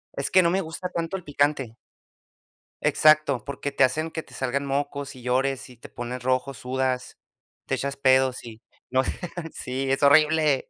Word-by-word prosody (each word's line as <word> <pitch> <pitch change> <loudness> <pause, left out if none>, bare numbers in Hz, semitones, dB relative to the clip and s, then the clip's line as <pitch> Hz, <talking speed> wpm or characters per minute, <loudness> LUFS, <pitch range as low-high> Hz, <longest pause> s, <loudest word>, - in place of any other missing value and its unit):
Es 140 - -2
que 185 0 +5
no 170 - +3
me 190 - +1
gusta 175 +2 -5
tanto 170 +2 -3
el 180 - -11
picante. 145 -5 0 1.1
Exacto, 155 -5 +4
porque 140 0 -4
te - - +3
hacen 155 +5 +1
que 160 - -5
te - - -18
salgan 135 +2 -2
mocos 140 0 -3
y 125 - -12
llores 130 +2 -1
y 125 - -15
te - - -13
pones 120 +1 -6
rojo, 130 +1 0
sudas, 130 0 -2 0.5
te - - 0
echas 140 0 -3
pedos 130 -1 +3
y 115 -1 -11 0.3
no 130 +1 +3 0.5
Sí, 135 +1 -3
es 135 +2 0
horrible. 150 -1 +4
140 Hz, 175 wpm, -25 LUFS, 130-155 Hz, 1.1 s, que